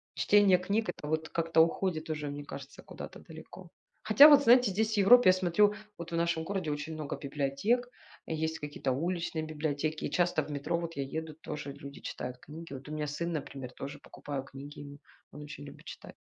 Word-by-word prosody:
Чтение 205 -3 +5
книг- 200 +5 -1
это 150 - -6
вот 160 +1 -1
как-то 165 -1 +2
уходит 165 -1 0
уже, 150 -2 -3
мне 145 0 -6
кажется, 140 -1 -9
куда-то - - -9
далеко. - - -12 0.3
Хотя, 290 - +9
вот 290 -2 +7
знаете, 245 -3 +6
здесь, 220 +3 0
в - - -4
Европе, 205 +2 +7
я - - +7
смотрю, 185 +3 +3 0.2
вот 170 0 -8
в - - -2
нашем 170 -1 0
городе, 185 -3 -2
очень 150 +2 -4
много 155 -2 -4
библиотек, 145 - -1 0.4
и 160 - -2
есть 160 +1 -2
какие-то 145 -2 -3
уличные 165 +2 -2
библиотеки. 155 0 -2
И - - -4
часто 175 0 +1
в - - -9
метро, 150 +4 -1
вот 170 -1 -5
я 140 - 0
еду, 155 +3 -5
тоже 150 -2 -6
люди 140 0 -10
читают 125 0 -6
книги. 155 +3 -10
Вот 135 +2 -9
у - - -7
меня 150 -1 -3
сын, 170 +4 -3
например, 135 -4 -5
тоже 140 +2 -8
покупаю 140 -2 -6
книги 140 +2 -10
ему. 145 0 -10 0.3
Он 150 - -9
очень 145 0 -9
любит 140 - -13
чита - - -10
155 Hz, 205 wpm, -31 LUFS, 145-180 Hz, 0.4 s, Хотя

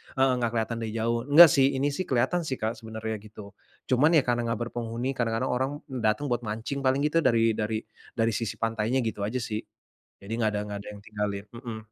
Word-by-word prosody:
heeh 135 0 +4
gak 120 - +1
kelihatan 115 +1 -1
dari 110 -1 -4
jauh, 115 +1 0
enggak 160 +4 +10
sih, 135 0 +3
ini 140 +2 +1
sih 185 +6 -3
kelihatan 130 +7 +1
sih 130 - -1
Kak 110 -2 -1
sebenarnya, 110 -1 -5
gitu. 105 -1 -12 0.4
Cuman 150 +6 +4
ya 145 - +5
karena 120 -1 0
enggak 115 -1 -1
berpenghuni, 120 +2 -3
kadang-kadang 120 -1 -1
orang 130 +2 0 0.2
datang 125 +2 0
buat 120 - +1
mancing 110 +6 -3
paling 135 +1 +1
gitu 150 +2 +2
dari 115 -6 +3
dari 110 0 -2 0.3
dari 115 -1 +2
sisi 110 0 -2
pantainya 115 +3 0
gitu 105 -3 -2
aja 125 +2 -2
sih. 110 -2 -3 0.6
Jadi 100 +3 -8
enggak 110 -2 +1
ada 105 - -1
enggak 100 0 -4
ada - - -9
yang 105 - -11
tinggalin, 105 -1 -4
mhm. 115 -1 -7
115 Hz, 210 wpm, -27 LUFS, 110-130 Hz, 0.6 s, enggak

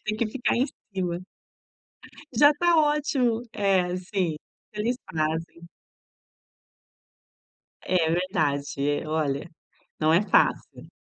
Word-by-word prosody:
Tem 215 0 -2
que 230 - 0
ficar 240 +4 -1
em 250 +3 +2 0.3
cima. 180 -2 -2 1.2
Já 290 +5 +7
tá 345 -1 +4
ótimo. 290 -6 +2
É, 190 -3 +1
sim, 185 -3 -2 0.4
eles 220 +4 -1 0.2
fazem. 160 +2 -3 2.2
É, 175 -3 +2
verdade, 145 -6 -1 0.2
é. - - -9
Olha, 155 -1 -1 0.5
não 155 +1 +3
é 170 - +5
fácil. - - +1
185 Hz, 105 wpm, -26 LUFS, 160-225 Hz, 2.2 s, Já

